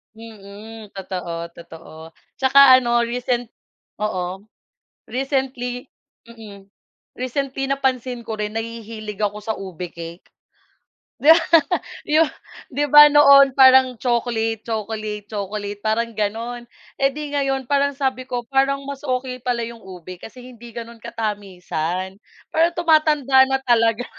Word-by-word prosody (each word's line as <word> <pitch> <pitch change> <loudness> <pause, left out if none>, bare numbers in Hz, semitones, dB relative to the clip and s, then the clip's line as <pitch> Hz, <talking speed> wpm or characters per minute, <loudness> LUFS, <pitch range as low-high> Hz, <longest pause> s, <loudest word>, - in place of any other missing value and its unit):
Mm, 220 -1 -12
totoo, 180 -3 -6
totoo, 165 -1 -12
at - - -35
saka 265 0 +7
ano 240 -2 +2
recent 240 0 -1 0.5
oo 190 -2 -4 0.7
recently 255 0 -3 0.4
mm, 205 -4 -13 0.5
recently 270 +2 -3
napansin 260 -3 -1
ko 225 -1 -6
rin 210 0 -4
nahihilig 225 -1 -6
ako 210 0 -2
sa 220 +1 -4
ube 180 -2 -7
cake. 170 +1 -10 0.9
'Di 310 +3 +8 0.9
ba 325 - +4 0.4
di 285 +2 -1
ba 295 0 +10
noon 280 -2 +6
parang 260 -1 +6
chocolate, 225 -2 -1
chocolate, 215 -2 -4
chocolate, 205 0 -5
parang 225 +2 -1
ganun 230 +3 -4 0.3
eh 275 - +4
di 290 +1 -7
ngayon 270 -2 -1
parang 280 +1 0
sabi 260 -2 -2
ko 245 -2 -3
parang 275 +2 0
mas 280 -1 -7
okey 255 -2 -3
pala 240 -1 -2
'yung 230 0 -9
ube 185 -2 -11
kasi 250 +2 -12
hindi 240 -2 -12
ganun 230 0 -8
katamisan, 190 -5 -4 0.4
parang 335 +2 +2
tumatanda 300 -5 +4
na 265 - +1
talaga 230 -1 +2
235 Hz, 125 wpm, -21 LUFS, 210-265 Hz, 0.9 s, ba